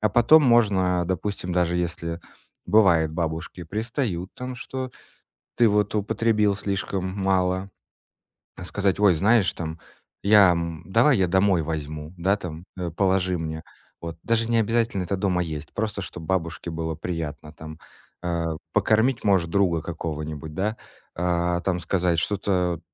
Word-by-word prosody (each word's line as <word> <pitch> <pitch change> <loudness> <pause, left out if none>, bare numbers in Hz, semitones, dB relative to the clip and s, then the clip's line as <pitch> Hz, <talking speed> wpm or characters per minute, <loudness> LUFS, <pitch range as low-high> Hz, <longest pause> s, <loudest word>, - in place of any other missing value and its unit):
А 105 - +3
потом 120 +9 +6
можно, 95 -8 +3
допустим, 95 0 -3
даже 90 -1 +1
если 85 -1 -3 0.5
бывает, 85 -7 +4
бабушки 80 +1 -4
пристают, 105 - -3
там, 125 0 -6
что 130 0 -5 0.7
ты 120 -2 +5
вот 105 0 +1
употребил 105 0 +1
слишком 100 -1 -2
мало, 95 0 0 0.9
э, 90 - -7
сказать: 100 +1 0
"Ой, 100 -4 +5
знаешь, 100 +3 +3
там, 80 -1 -6 0.4
я, 100 -2 +7
м, 85 -2 -3
давай 115 +7 +4
я 95 - +2
домой 95 -1 +3
возьму, 75 0 -5
да, 95 +4 +2
там, 85 -2 -8
э, 90 -2 -3
положи 95 0 +1
мне". 80 0 -5 0.4
Вот 85 -1 -6
даже 115 0 +1
не 115 - +3
обязательно 115 -2 +1
это 95 +3 -2
дома 95 -2 +1
есть. 75 -2 -6
Просто 105 -2 -2
чтоб 85 -2 -7
бабушке 85 -1 -2
было 80 -1 -3
приятно, 80 -2 -5
там. 80 +1 -10 0.4
Э, 85 -2 -2 0.2
покормить, 115 +3 +2
может, 95 -5 +2
друга 90 -4 +2
какого-нибудь, 75 -2 -5
да? 105 +6 -2 0.4
А, 85 0 0
там, 90 -1 -1
сказать 85 0 +1
что-то, 90 -4 0
90 Hz, 145 wpm, -24 LUFS, 85-105 Hz, 0.9 s, я